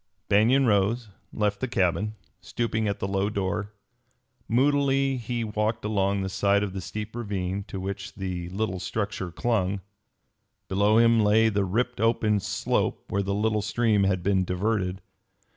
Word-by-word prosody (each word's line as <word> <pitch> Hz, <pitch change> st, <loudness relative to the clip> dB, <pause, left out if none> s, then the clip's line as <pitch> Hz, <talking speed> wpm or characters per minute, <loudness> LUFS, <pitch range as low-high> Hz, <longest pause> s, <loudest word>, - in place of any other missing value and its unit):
Banion 120 Hz, +7 st, +4 dB
rose 110 Hz, +2 st, +1 dB, 0.2 s
and -, -, -7 dB
left 105 Hz, -1 st, +1 dB
the 130 Hz, -, -1 dB
cabin, 105 Hz, +1 st, 0 dB, 0.2 s
stooping 110 Hz, +3 st, -2 dB
at 100 Hz, -, -1 dB
the 95 Hz, -, -3 dB
low 100 Hz, +1 st, 0 dB
door. 100 Hz, 0 st, -2 dB, 0.8 s
Moodily 135 Hz, +1 st, +2 dB
he 120 Hz, 0 st, -3 dB
walked 105 Hz, +1 st, -1 dB
along 100 Hz, -2 st, +1 dB
the -, -, -2 dB
side 100 Hz, +1 st, +2 dB
of 100 Hz, -2 st, -3 dB
the 95 Hz, -, -4 dB
steep 105 Hz, +4 st, -6 dB
ravine 100 Hz, -4 st, -3 dB
to 95 Hz, -, -6 dB
which 95 Hz, +1 st, -5 dB
the 90 Hz, -3 st, -4 dB
little 95 Hz, 0 st, -2 dB
structure 100 Hz, -2 st, -3 dB
clung. 100 Hz, -2 st, 0 dB, 0.9 s
Below 100 Hz, +3 st, +3 dB
him 115 Hz, 0 st, +5 dB
lay 110 Hz, +2 st, +4 dB
the 100 Hz, -2 st, 0 dB
ripped 125 Hz, +6 st, -1 dB
open 110 Hz, -2 st, +2 dB
slope -, -, -1 dB
where 100 Hz, -, +1 dB
the 100 Hz, 0 st, -1 dB
little 105 Hz, 0 st, +1 dB
stream 105 Hz, -1 st, +2 dB
had 95 Hz, -2 st, 0 dB
been 95 Hz, -1 st, +2 dB
diverted. 95 Hz, 0 st, -1 dB
105 Hz, 160 wpm, -26 LUFS, 95-115 Hz, 0.9 s, him